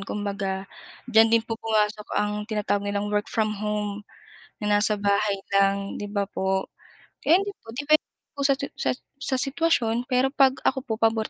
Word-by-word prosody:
kumbaga. 200 -1 -3 0.5
Diyan 225 +1 +7
din 230 0 +3
po 225 -1 -5
pumasok 210 -1 0
ang 210 0 +1 0.2
tinatawag 210 -2 0
nilang 205 +1 -2
work 210 0 0
from 215 -2 0
home, 210 -1 -2 0.6
na 210 -1 +2
nasa 210 0 +1
bahay 200 0 +1 0.2
lang 195 0 +2
'di 205 -1 -6
ba 200 -1 -1
po. 190 -1 -1 0.5
Kaya 335 +4 +5
yun 395 - -2
din - - -57
po - - -16
depende 295 +5 +2 0.3
po 285 - -6
sa 275 -1 +3
sa 280 0 -3 0.3
sa 270 - 0
sitwasyon 255 -5 +1
pero 260 +2 +2
'pag 265 -2 +4
ako 265 0 +2
po 230 -4 -4
pabor 225 -1 +1
215 Hz, 175 wpm, -25 LUFS, 205-250 Hz, 0.6 s, Diyan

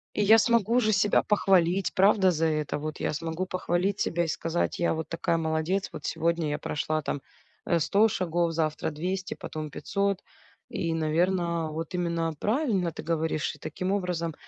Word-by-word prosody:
И 210 - +2
я 220 +2 +7
смогу 235 +1 +3
же 215 -3 +2
себя 205 +1 +3
похвалить, 190 -3 +2
правда, 195 -1 +4
за 165 -1 0
это, 155 -2 0
вот, 155 +1 -5
я - - -1
смогу 165 +4 -3
похвалить 185 +1 -1
себя 170 +1 +1
и - - -2
сказать: 165 +1 -1
"Я 170 - +2
вот 160 -1 -4
такая 165 0 0
молодец, 160 +4 -1
вот - - -8
сегодня 170 -1 0
я 145 - -1
прошла 155 +1 -2
там, 145 -1 -3 0.4
э, 170 - +2
100 200 +7 +4
шагов, 175 -4 0
завтра- 155 -1 -1
200, 185 +5 -3
потом- 155 -1 -6
500", 200 +3 -1 0.5
и, 165 -1 -2
наверно, 170 +1 0
вот 160 +2 -5
именно 170 -2 -1
правильно 210 - +1
ты - - -8
говоришь. 160 -2 -1
И - - -19
таким 180 +4 -3
образом 180 -4 -1
170 Hz, 175 wpm, -27 LUFS, 160-190 Hz, 0.5 s, я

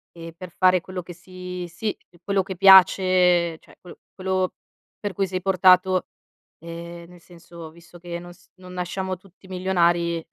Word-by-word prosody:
e 165 0 -9
per 185 -2 -10
fare 185 +1 +3
quello 185 +1 -7
che 175 0 -11
si 180 0 -8
sì, 175 +5 -4 0.3
quello 195 0 0
che 190 0 -7
piace, 185 -2 +5
cioè - - -22
quello- 180 - -13 0.2
quello 185 -1 -2 0.5
per 205 -2 -4
cui 195 +2 0
sei 185 0 -4
portato, 185 0 +4 0.5
ehm, 170 +1 -9
nel 180 0 -16
senso, 170 -2 -13
visto 170 +1 -17
che 170 0 -6
non 175 0 -11
s 180 +1 -25
non 185 -1 -13
nasciamo 185 +1 -4
tutti 190 +1 -21
milionari 175 -3 0
180 Hz, 165 wpm, -23 LUFS, 170-185 Hz, 0.5 s, piace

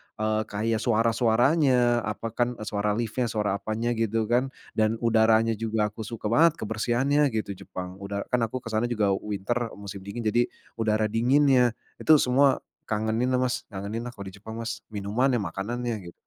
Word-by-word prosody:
eee, 110 0 0
kayak 110 +2 -1
suara-suaranya, 120 +2 +3
apa, 110 +2 -4
kan 120 +2 0
suara 105 -1 -1
lift-nya 120 +2 -1
suara 105 -3 -1
apanya 110 +3 -2
gitu 115 -1 0
kan, 120 +4 +1 0.2
dan 110 0 +1
udaranya 110 -1 +3
juga 110 -2 0
aku 110 0 -7
suka 110 -2 -4
banget 165 +5 +5
kebersihannya 120 +7 +1
gitu, 105 -2 -2 0.2
Jepang, 90 +1 -7
udah 100 0 -4
kan 125 - +3
aku 125 +3 -6
ke 115 - -6
sana 110 +2 +1
juga 105 -4 +1
winter, 105 +4 -2 0.2
musim 100 -1 -8
dingin 115 +4 -5
jadi 120 +2 +2 0.3
udara 110 -1 +1
dinginnya, 125 +1 +4 0.2
itu 155 - +6
semua 135 0 +3 0.2
kangeninlah 110 +4 0
Mas, 130 0 -2
ngangenin 105 +4 -5
lah, 125 - -8
kalau 100 - -7
di 100 - -15
Jepang 110 +3 -8
Mas, 115 0 -4
minumannya, 110 +5 0
makanannya, 115 +6 -3
gitu. 85 - -10
115 Hz, 165 wpm, -26 LUFS, 105-120 Hz, 0.3 s, itu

